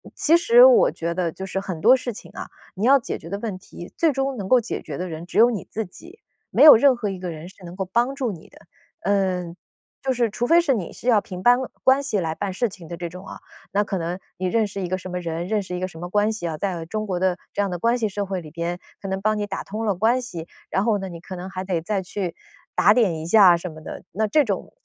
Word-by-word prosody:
其 320 - +4
实 470 +8 +7
我 - - +6
觉 170 +1 -3
得 175 -2 -1
就 190 - -7
是 195 0 -3
很 185 -4 -5
多 245 +4 +7
事 250 -1 -3
情 - - -12
啊， - - -7 0.3
你 200 +4 -1
要 275 +3 +7
解 250 - -4
决 165 - -11
的 200 - -3
问 210 -4 -4
题， 175 -1 -11
最 330 -2 +3
终 270 0 -1
能 195 -3 -5
够 255 +5 +5
解 235 - -4
决 145 -3 -7
的 180 - -3
人 165 0 -7
只 - - -6
有 235 +2 +7
你 215 - -5
自 220 0 -3
己， 345 - -14 0.3
没 - - +4
有 305 - +12
任 260 +3 +5
何 225 -4 -3
一 190 -1 -5
个 180 -1 -4
人 165 +1 -8
是 190 0 -18
能 175 +1 -9
够 190 0 -3
帮 240 +8 0
助 255 -5 -1
你 170 -5 -11
的。 - - -18 0.4
呃， 185 -3 0 0.5
就 265 -1 +1
是 240 -2 +1
除 235 +3 -2
非 335 +6 +5
是 305 -5 +2
你 185 -7 -5
是 - - -9
要 230 -4 +5
凭 185 -2 -8
班 245 +4 +6 0.3
关 265 +2 +4
系 215 -7 0
来 160 -3 -2
办 195 +1 -3
事 235 +5 0
情 180 -4 -12
的 170 - -6
这 170 0 -5
种 180 +2 -11
啊， - - -9 0.3
那 205 +1 +2
可 200 -1 -3
能 175 +1 -3 0.2
你 185 - -3
认 220 +3 +1
识 200 0 -7
一 180 - -2
个 185 +1 -1
什 185 - -8
么 180 0 -3
人， 170 0 -4
认 210 0 0
识 180 -1 -6
一 - - -3
个 185 - -2
什 175 - -13
么 175 - -5
关 210 +3 +2
系 215 -6 -4
啊， 160 - -3
在 175 -2 -3
中 215 +5 -4
国 185 -3 -2
的 185 -1 +1 0.2
这 - - -6
样 195 - -2
的 175 - -4
关 235 +5 +2
系 225 -3 0
社 205 +1 -3
会 190 -1 -2
里 155 -2 -12
边 170 +2 -3 0.2
可 195 - -6
能 190 0 -3
帮 215 +1 +1
你 205 - -2
打 195 -1 -4
通 215 +3 -5
了 205 -3 +1
关 230 +7 +2
系， 170 -10 -7 0.2
然 190 - 0
后 220 -3 +2
呢， 190 -1 -5
你 170 -1 -8
可 185 +2 -8
能 180 +1 -7
还 185 -1 -5
得 180 -3 -1
再 195 +3 -2
去 180 -2 -4 0.4
打 - - +5
点 215 -9 +2
一 155 - -6
下 185 0 +7
啊 - - +2
什 170 +1 -6
么 155 0 -12
的， - - -8
那 215 +4 0
这 295 +8 +4
种 200 -5 -3
195 Hz, 315 characters per minute, -23 LUFS, 180-230 Hz, 0.5 s, 有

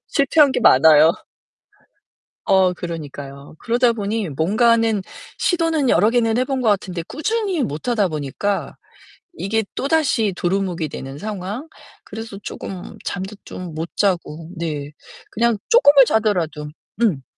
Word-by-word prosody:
실패한 280 0 +3
게 - - -1
많아요. 155 - +6 1.3
어 190 -1 +4
그러니까요. 145 -4 -8
그러다 240 0 +2
보니 210 -4 -3
뭔가는 220 - +2 0.4
시도는 330 -5 +1
여러 205 +6 +4
개는 230 -1 +1
해 255 - +2
본 265 0 -2
것 225 - +2
같은데 185 -4 -1
꾸준히 395 - -1
못 150 - -4
하다 215 -6 +2
보니까 155 +7 -3 0.6
이게 220 - -1
또다시 275 - +1
도루묵이 180 -4 -1
되는 135 0 -7
상황. 210 - -5 0.4
그래서 225 -3 -8
쪼금 185 -2 -7
잠도 190 +3 -5
좀 180 -3 -8
못 160 +2 -4
자고 170 -5 -1
네. 150 -4 -4 0.4
그냥 235 0 +1
쪼끔을 285 - +7
자더라도 175 -10 0 0.3
음. 170 - +1
200 Hz, 270 characters per minute, -20 LUFS, 165-235 Hz, 1.3 s, 쪼끔을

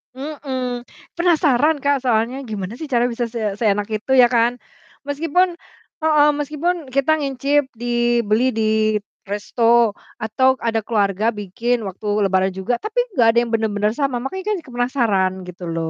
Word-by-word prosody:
Mhm, 260 -4 -4 0.3
penasaran 315 -4 +3
Kak, 280 -1 +1
soalnya, 245 +2 0
gimana 200 0 -4
sih 310 -2 -7
cara 240 -1 +2
bisa 235 -1 -2
se 220 -4 -2
seenak 205 -2 +1
itu 215 +5 -3
ya 250 - +8
kan, 240 0 +2 0.5
meskipun 330 +5 +1 0.5
heeh, 305 -2 +4
meskipun 305 +5 -1
kita 275 +3 +1
nyicip 280 0 0
dibeli 240 0 +1
di 220 - +1 0.7
resto 230 +2 +2 0.2
atau 260 +4 +2
ada 225 -1 -1
keluarga 210 -1 +1
bikin 220 +2 -2
waktu 195 +3 -7 0.2
Lebaran 190 0 +2
juga, 190 +5 -3
tapi 435 +3 -2
gak 235 -4 +4
ada 230 - +2
yang 235 -1 -3
bener-bener 210 -1 0
sama, 270 -2 -1
makanya 320 +10 -5
kan 420 - +1
penasaran 240 -7 0
gitu 180 0 -10
loh, 165 -1 -2
240 Hz, 145 wpm, -20 LUFS, 215-275 Hz, 0.7 s, ya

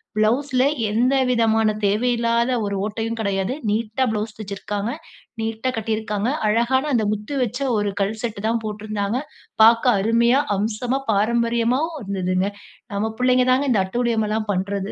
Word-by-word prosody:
ப்ளவுஸ்ல 250 +5 +2 0.3
எந்தவிதமான 230 -3 +2
தேவையில்லாத 235 +3 +1
ஒரு 200 0 -2
ஓட்டையும் 225 +2 -3
கிடையாது. 195 +1 -1 0.2
நீட்டா 225 +4 0
ப்ளவுஸ் 210 0 -3
தெச்சிருக்காங்க. 205 +2 -4 0.5
நீட்டா 225 +3 -2
கட்டியிருக்காங்க. 220 0 -1 0.2
அழகான 260 +6 +1
அந்த 220 - +1
முத்து 215 +7 -5
வச்ச 245 +3 -4 0.2
ஒரு 205 -1 0
கல் 210 +3 -1
செட்டுதான் 225 +1 -1
போட்ருந்தாங்க. 210 +1 -2 0.4
பார்க்க 230 +1 +5
அருமையா, 235 +5 +3 0.2
அம்சமா 230 +5 -1
பாரம்பரியமாகவும் 235 +8 +1
இருந்ததுங்க. 190 -1 -1 0.5
நம்ம 220 +2 -1
பிள்ளைங்க 250 0 +3
தாங்க 265 +1 +2
இந்த 205 - +3
அட்டூழியம்லாம் 220 -1 -1
பண்றது. 195 +1 -2
225 Hz, 120 wpm, -22 LUFS, 210-245 Hz, 0.5 s, பார்க்க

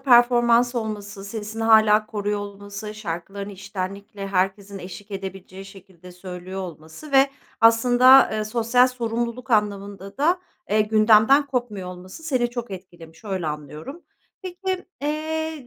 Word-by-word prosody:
performans 240 -1 +4
olması, 205 -3 -5
sesini 220 +1 -5
hâlâ 220 -1 +5
koruyor 205 -1 -2
olması, 205 +1 -8
şarkılarını 200 +1 -6
içtenlikle 195 +1 -6
herkesin 195 +1 -1
eşlik 200 +3 -10
edebileceği 195 0 -7
şekilde 190 -2 -14
söylüyor 180 +1 -7
olması 170 - -9
ve 270 0 +5 0.3
aslında, 245 +3 +6
eee, 215 0 -1
sosyal 235 +3 +3
sorumluluk 240 0 -4
anlamında 200 -2 -1
da, 345 +5 +2 0.3
eee, 215 +1 +3
gündemden 215 +6 +5
kopmuyor 240 -8 -3
olması 185 - -10
seni 255 -6 0
çok 240 -2 -5
etkilemiş, 175 -2 -11
öyle 190 -5 -3
anlıyorum. 150 - -7 0.4
Peki, 370 0 -4 0.2
eee, 315 -1 -3
210 Hz, 125 wpm, -23 LUFS, 195-245 Hz, 0.4 s, aslında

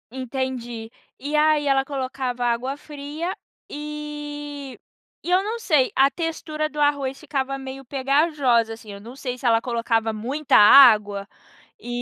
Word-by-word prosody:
Entendi. 250 -3 -5 0.3
E 295 +3 -2
aí, 305 -1 +3
ela 270 -1 +2
colocava 260 -3 -3
água 240 +3 -1
fria, 295 +4 -6 0.4
eh, 295 -2 -7 0.5
e - - -5
eu 365 +1 +4
não 440 +3 -3
sei, 300 - +2
a 275 +1 +4
textura 315 -2 -3
do 300 -1 -5
arroz 280 -2 +1
ficava 275 -1 -3
meio 270 0 -8
pegajosa, 270 -3 +1
assim. 225 -2 -11
Eu 200 - -9
não 235 +5 -11
sei 255 -2 -5
se 250 - -10
ela 230 -1 +4
colocava 230 -2 0
muita 255 +7 +1
água, 210 -4 +7 0.6
eh, - - -12
270 Hz, 145 wpm, -23 LUFS, 240-295 Hz, 0.6 s, água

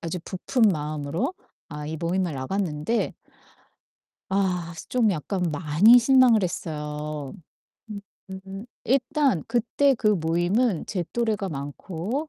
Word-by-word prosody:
아주 170 +2 -4
부푼 215 +6 -2
마음으로 150 - -3 0.4
아 150 0 -6
이 160 +1 -4
모임을 175 +2 -1
나갔는데 160 - -1 1.2
아 180 -3 0 0.2
좀 235 -4 +3
약간 180 +2 -2
많이 160 +10 +5
실망을 245 -3 +5
했어요. 150 -4 -4 0.6
음. 205 -1 -5 0.4
음. 195 +3 -8 0.2
일단 270 - +1
그때 245 +4 +2
그 220 -3 0
모임은 175 +3 +1
제 185 -4 -2
또래가 220 -4 0
많고 170 - -4
185 Hz, 220 characters per minute, -25 LUFS, 155-230 Hz, 1.2 s, 많이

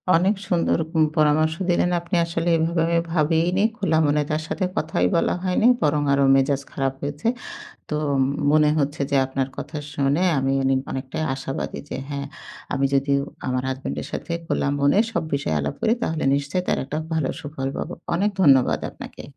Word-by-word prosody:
অনেক 190 +5 +3
সুন্দর 175 -4 +2 0.2
উম 160 - +5
পরামর্শ 155 +1 +3
দিলেন। 175 0 +2
আপনি 170 +2 -4
আসলে 170 0 -2
এভাবে 165 +1 0
আমি 170 0 +2
ভাবিইনি। 170 +4 +2
খোলা 190 -8 +1
মনে 150 0 +2
তার 155 0 0
সাথে 190 - -1
কথাই 160 +1 0
বলা 170 - +2
হয়নি। 185 +5 +2
বরং 150 0 +2
আরো 140 0 +3
মেজাজ 135 +1 +2
খারাপ 135 -1 -1
হয়েছে। 145 +7 -3 0.6
তো - - -3 0.3
ম - - 0 0.2
মনে 150 -1 +5
হচ্ছে 145 +1 -1
যে 140 - +2
আপনার 135 0 -2
কথা 155 - -6 0.2
শুনে 140 +5 +1 0.2
আমি 135 0 0
অনেক 135 0 +3
অনেকটাই 135 +3 -4
আশাবাদী 135 0 -4
যে - - -3
হ্যাঁ 140 0 -4 0.5
আমি 135 0 +1
যদি 140 +1 +1 0.4
আমার 130 0 0
হাসব্যান্ডের 130 +1 -4
সাথে 170 - -4
খোলা - - 0
মনে 145 +8 +4
সব - - 0
বিষয়ে 140 - -1
আলাপ 70 0 -3
করি 220 - +2
তাহলে 160 -8 -1
নিশ্চয়ই 145 +6 -1
তার - - +2
একটা 150 +3 -4
ভালো 155 -4 0
সুফল 145 -2 -4
পাবো। - - -4 0.2
অনেক 200 +5 +2
ধন্যবাদ 135 -7 +5
আপনাকে। - - -10
150 Hz, 175 wpm, -23 LUFS, 135-170 Hz, 0.6 s, উম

